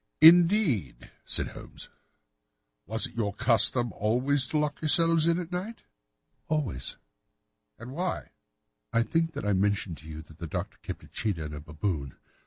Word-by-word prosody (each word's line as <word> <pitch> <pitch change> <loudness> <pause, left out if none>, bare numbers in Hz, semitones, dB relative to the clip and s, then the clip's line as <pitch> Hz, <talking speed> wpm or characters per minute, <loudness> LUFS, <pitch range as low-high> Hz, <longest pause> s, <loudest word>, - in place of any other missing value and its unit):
"Indeed," 165 - +5
said - - +3
Holmes. - - -10 1.0
"Was 110 +3 +2
it - - -7
your 105 -4 -2
custom 120 0 +4
always 125 +5 +1
to 155 - -1
lock 150 -1 -1
yourselves 165 +1 +3
in 170 0 +3
at 180 -1 -5
night?" 195 +6 -5 0.6
"Always." 135 - -2 0.8
"And 120 +3 -9
why?" 175 +5 -3 0.6
"I 115 0 +2
think 165 +5 0
that - - -5
I 105 - +2
mentioned 95 -4 0
to 75 - -14
you 80 0 -8
that 80 0 -18
the 85 - -5
Doctor - - -5
kept - - -7
a - - -14
cheetah 95 -8 -3
and 75 - -7
a 75 - -6
baboon. 75 -2 -4
115 Hz, 160 wpm, -28 LUFS, -, 1.0 s, Indeed